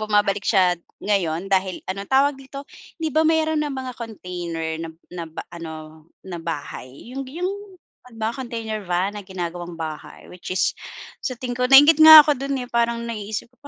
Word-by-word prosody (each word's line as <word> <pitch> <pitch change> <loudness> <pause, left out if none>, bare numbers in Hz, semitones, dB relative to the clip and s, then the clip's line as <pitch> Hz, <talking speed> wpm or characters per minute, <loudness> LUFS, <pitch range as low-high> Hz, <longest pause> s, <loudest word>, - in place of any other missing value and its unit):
bumabalik 205 -2 +1
siya 185 -4 +4 0.3
ngayon 185 -3 0
dahil, 190 -1 0
ano 195 +1 -4
tawag 275 +2 +3
dito? 275 +1 -9 0.3
Di 320 -2 -2
ba 315 - +3
mayroon 315 -1 +2
nang 295 -2 -3
mga 260 -1 -5
container 175 -7 -5
na 165 - -5 0.2
na 175 -1 -5
ba 160 - -7
ano 170 -2 -8 0.5
na 180 -2 -6
bahay 145 - -7
yung 270 0 -5
yung 345 +8 -3 0.7
mga 220 +2 -1
container 230 -4 -4
van 180 +3 0
na - - -8
ginagawang 175 -2 -6
bahay? 155 -2 -7
Which 180 - -10
is - - +2 0.5
sa 255 - -2
tingin 245 -1 -4
ko 250 - +1
nainggit 290 +4 +8
nga 315 -1 +12
ako 295 -4 +1
do'n, 275 +1 -2
eh, - - -13
parang 235 0 0
naiisip 220 -1 -5
ko - - -32
215 Hz, 175 wpm, -22 LUFS, 180-265 Hz, 0.7 s, nga